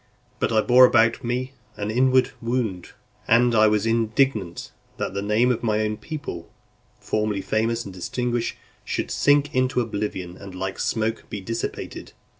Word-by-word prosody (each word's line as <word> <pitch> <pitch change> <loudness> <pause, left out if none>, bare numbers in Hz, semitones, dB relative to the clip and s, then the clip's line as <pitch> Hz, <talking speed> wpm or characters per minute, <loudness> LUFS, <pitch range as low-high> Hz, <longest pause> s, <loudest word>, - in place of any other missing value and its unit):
But - - 0
I 110 -1 +4
bore 125 +3 +7
about 115 -2 +4
with - - -23
me 125 +2 -2 0.2
an 105 +1 -3
inward 130 +2 +3
wound, 115 -7 -2 0.3
and 120 +1 +4
I 110 -1 +5
was 105 0 +1
indignant, 115 -4 0 0.3
that - - -3
the 100 - -2
name 110 +5 +2
of 120 - -1
my 110 -2 +1
own 105 0 -1
people, 145 - -7 0.5
formerly 105 -2 -1
famous 115 +3 -1
and 95 - -8
distinguished, 120 +6 -2 0.3
should - - -3
sink 145 0 +3
into 130 0 +1
oblivion, 100 -6 -3
and 95 -2 -10
like 95 +1 -4
smoke 110 0 -1
be 105 - -4
dissipated. 115 +4 -5
115 Hz, 160 wpm, -24 LUFS, 105-125 Hz, 0.5 s, bore